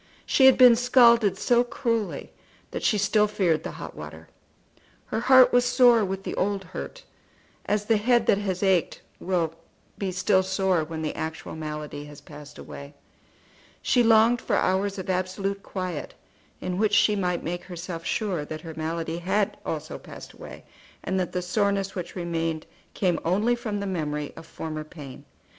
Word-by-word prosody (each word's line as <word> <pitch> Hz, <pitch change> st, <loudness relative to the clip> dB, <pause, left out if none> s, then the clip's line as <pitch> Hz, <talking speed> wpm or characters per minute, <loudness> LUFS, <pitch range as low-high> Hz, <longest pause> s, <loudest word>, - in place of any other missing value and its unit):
She 265 Hz, -, +5 dB
had 265 Hz, -, +6 dB
been 250 Hz, -2 st, +8 dB
scalded 235 Hz, -4 st, +5 dB
so 240 Hz, +3 st, +3 dB
cruelly 230 Hz, -3 st, -3 dB, 0.4 s
that -, -, -4 dB
she 215 Hz, -, +2 dB
still 210 Hz, +1 st, +3 dB
feared 180 Hz, -6 st, +1 dB
the -, -, -5 dB
hot -, -, -8 dB
water. 80 Hz, +1 st, -10 dB, 0.8 s
Her -, -, -3 dB
heart 260 Hz, +1 st, +6 dB
was 245 Hz, 0 st, +5 dB
sore 245 Hz, -2 st, +5 dB
with 195 Hz, 0 st, -3 dB
the -, -, -4 dB
old 200 Hz, 0 st, -1 dB
hurt, -, -, -8 dB, 0.6 s
as 210 Hz, 0 st, 0 dB
the 225 Hz, 0 st, +3 dB
head 240 Hz, +3 st, +2 dB
that 200 Hz, -, +3 dB
has 190 Hz, -2 st, -3 dB
ached 190 Hz, -4 st, +1 dB, 0.2 s
will 170 Hz, -3 st, -1 dB, 0.5 s
be 195 Hz, -2 st, -2 dB
still 185 Hz, +1 st, +2 dB
sore 190 Hz, -2 st, 0 dB
when 160 Hz, 0 st, -6 dB
the 155 Hz, -, -2 dB
actual 160 Hz, 0 st, -5 dB
malady 150 Hz, -2 st, -6 dB
has 145 Hz, -1 st, -12 dB
passed 150 Hz, -1 st, -13 dB
away. 140 Hz, +1 st, -10 dB, 0.9 s
She 245 Hz, -, +3 dB
longed 230 Hz, +1 st, +4 dB
for -, -, -1 dB
hours 195 Hz, +2 st, 0 dB
of 190 Hz, -, -6 dB
absolute 190 Hz, +2 st, -2 dB
quiet, 185 Hz, -6 st, -5 dB, 0.5 s
in 180 Hz, +1 st, -3 dB
which 210 Hz, -1 st, +2 dB
she 210 Hz, +1 st, +4 dB
might 180 Hz, -3 st, -1 dB
make 175 Hz, +2 st, -4 dB
herself 170 Hz, -2 st, -7 dB
sure 190 Hz, -5 st, -1 dB
that 155 Hz, +1 st, -7 dB
her 165 Hz, -1 st, -8 dB
malady 165 Hz, +1 st, -3 dB
had 200 Hz, +3 st, 0 dB
also 155 Hz, -1 st, -5 dB
passed -, -, -11 dB
away, -, -, -11 dB, 0.4 s
and 190 Hz, 0 st, -1 dB
that 180 Hz, -, -2 dB
the 180 Hz, -1 st, -2 dB
soreness 195 Hz, +1 st, 0 dB
which 180 Hz, -2 st, -6 dB
remained 165 Hz, -3 st, -2 dB, 0.3 s
came 180 Hz, -4 st, +1 dB
only 205 Hz, +8 st, +2 dB
from 220 Hz, -4 st, -4 dB
the 200 Hz, -, -3 dB
memory 150 Hz, -6 st, -3 dB
of 165 Hz, -, -11 dB
former 155 Hz, -2 st, -6 dB
pain. 150 Hz, -4 st, -11 dB
190 Hz, 170 wpm, -25 LUFS, 165-210 Hz, 0.9 s, been